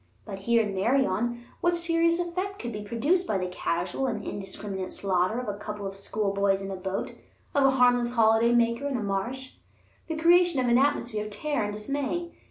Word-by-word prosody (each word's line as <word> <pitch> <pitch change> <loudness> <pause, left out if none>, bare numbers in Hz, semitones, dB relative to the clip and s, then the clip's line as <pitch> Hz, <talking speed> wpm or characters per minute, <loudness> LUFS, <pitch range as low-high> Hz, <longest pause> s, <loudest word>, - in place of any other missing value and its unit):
But 195 -3 -7
here 230 +3 +3
in 205 -2 -3
Meirion, 240 +2 +1 0.2
what 345 0 +2
serious 335 0 +2
effect 365 +3 -3
could 240 - -5
be 210 -1 -5
produced 280 - 0
by 200 - +1
the 185 - -2
casual 180 +6 -2
and 220 -4 -3
indiscriminate 195 -1 -5
slaughter 190 +3 0
of 250 - -5
a 205 0 -4
couple 210 -1 -6
of 195 0 -5
schoolboys 200 -1 0
in 195 0 -5
a - - -3
boat, 190 +1 -3 0.4
of 280 -1 +3
a - - +7
harmless 245 -1 +4
holiday 225 +1 +4
maker 235 +3 +2
in 275 -3 -1
a 220 - -3
marsh? 235 +7 -3 0.5
The 320 - -3
creation 345 -1 +4
of 255 - +1
an 240 +1 +5
atmosphere 240 -6 0
of - - -6
terror 280 +4 -2
and 205 - -4
dismay? 285 +10 -3
235 Hz, 195 wpm, -27 LUFS, 200-280 Hz, 0.5 s, a